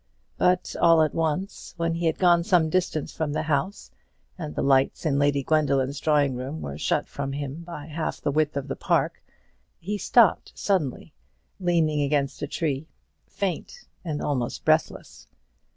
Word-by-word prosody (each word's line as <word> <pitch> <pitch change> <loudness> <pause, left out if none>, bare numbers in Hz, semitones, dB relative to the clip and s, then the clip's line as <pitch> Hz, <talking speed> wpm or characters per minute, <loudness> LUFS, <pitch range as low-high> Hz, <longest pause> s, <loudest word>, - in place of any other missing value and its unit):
But 180 0 +2
all 165 -2 +6
at 155 - -1
once, 165 +5 -3
when 165 0 0
he 170 0 -1
had 160 - 0
gone 175 -2 +4
some 170 -4 +3
distance 175 -4 -1
from 155 -2 -2
the 155 - -1
house, 160 +6 -2 0.4
and 155 -5 -6
the - - -1
lights 135 +3 +2
in 140 -3 +2
Lady 145 -1 +2
Gwendoline's 140 -2 +1
drawing 145 -3 +2
room 130 +5 -5
were 70 - -6
shut - - 0
from 135 -1 -4
him 145 +2 -5
by 165 -4 -8
half 160 +1 -4
the 145 - -1
width 150 0 +1
of 140 - -3
the - - -3
park, - - 0 0.6
he 205 +4 -4
stopped 230 -2 +3
suddenly, 160 -6 -1 0.5
leaning 165 -5 +1
against 140 -1 0
a - - -2
tree, 150 -2 -2 0.4
faint 200 - -4 0.2
and 155 -4 -3
almost 125 -5 -2
breathless. 155 -1 0
155 Hz, 165 wpm, -25 LUFS, 140-170 Hz, 0.6 s, all